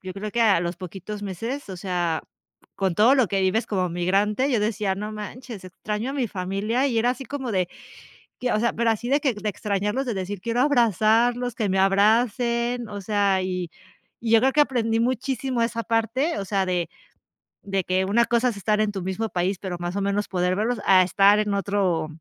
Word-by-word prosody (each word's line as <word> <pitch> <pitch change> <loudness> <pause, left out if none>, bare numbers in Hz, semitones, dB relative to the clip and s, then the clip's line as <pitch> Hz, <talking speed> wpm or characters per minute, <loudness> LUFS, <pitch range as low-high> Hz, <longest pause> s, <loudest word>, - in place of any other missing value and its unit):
yo 185 -1 -6
creo 210 +2 -5
que 235 +2 +1
a 200 -6 +4
los 170 0 -3
poquitos 195 +3 -7
meses, 225 +6 -5
o 185 - -6
sea, 175 -3 -1 0.5
con 190 -3 0
todo 230 +9 +5
lo 255 -8 +3
que 195 - 0
vives 190 +5 +1
como 185 -3 -1
migrante, 200 +9 +1
yo 230 - +2
decía: 210 -2 0
"No 210 +2 -5
manches, 215 0 -8
extraño 210 +6 -4
a - - -4
mi 260 -6 -1
familia", 200 +8 -1
y 235 -5 0
era 240 +2 +3
así 265 +2 -5
como 265 -2 -5
de 185 -4 0 0.7
que, 250 -1 0
o - - +2
sea, 235 +2 +1
pero 235 0 +1
así 225 +2 -2
de 285 +3 +3
que 270 -6 +1
de 210 +1 -4
extrañarlos, 210 +5 -1
de 235 - -2
decir: 190 0 -4
"Quiero 230 +4 -1
abrazarlos, 240 - +2
que 220 -3 -1
me 190 0 +1
abracen", 235 +4 +2
o 205 -1 -6
sea, 200 -1 +1
y 180 -2 -3 0.5
y 230 - -3
yo 225 - +7
creo 265 +3 +3
que 300 - +3
aprendí 230 -5 0
muchísimo 255 0 -1
esa 230 0 -1
parte, 230 +7 0
o 200 - -3
sea, 195 -1 0
de 180 -2 -1 0.7
de 195 -1 -2
que 185 +2 0
una 225 +5 +3
cosa 240 +2 +2
es 225 - -5
estar 210 +2 +1
en 215 - +1
tu 195 -2 -5
mismo 190 +5 -3
país, 185 +1 -1
pero 185 -3 -5
más 175 +2 -4
o 200 - -1
menos 200 +1 0
poder 180 -1 0
verlos 225 +5 -1
a 185 -1 +6
estar 195 +3 +4
en 210 -1 0
otro, 195 -5 0
210 Hz, 215 wpm, -24 LUFS, 190-235 Hz, 0.7 s, yo